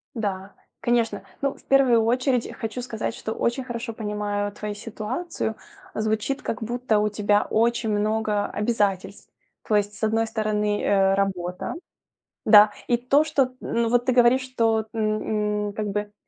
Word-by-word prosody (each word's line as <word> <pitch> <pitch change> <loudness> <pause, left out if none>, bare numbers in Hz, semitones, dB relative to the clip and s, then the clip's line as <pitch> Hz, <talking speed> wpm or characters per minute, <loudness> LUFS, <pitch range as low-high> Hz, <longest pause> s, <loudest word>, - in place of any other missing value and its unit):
Да, 200 -3 -3 0.3
конечно. 225 -5 0 0.2
Ну, 275 0 0
в - - -20
первую 255 -5 +4
очередь, 250 +1 +1
хочу 225 +3 -4
сказать, 225 -2 -4
что 220 - -4
очень 240 +4 -1
хорошо 240 -1 -5
понимаю 210 -1 -2
твою 210 0 -5
ситуацию. 220 +5 -4 0.4
Звучит, 220 +6 -1
как 225 - -4
будто, 240 -1 0
у 210 0 +1
тебя 205 0 +2
очень 230 0 +1
много 210 0 0
обязательств. 205 -3 -1 0.4
То 215 - +2
есть, 205 0 +1
с 220 - -10
одной 225 +1 +2
стороны, 210 -2 -1
э, 195 -1 +3
работа, 185 -2 -2 0.7
да? 210 -1 +8 0.2
И 240 - +3
то, 265 +5 +3
что, 270 -5 +1
ну 235 0 0
вот 245 +1 +2
ты 255 - +3
говоришь, 245 +1 +5
что, 225 -4 0
м, 215 -1 -1
м, - - -6
как 210 0 -3
бы, 210 +1 -3
220 Hz, 155 wpm, -24 LUFS, 210-240 Hz, 0.7 s, да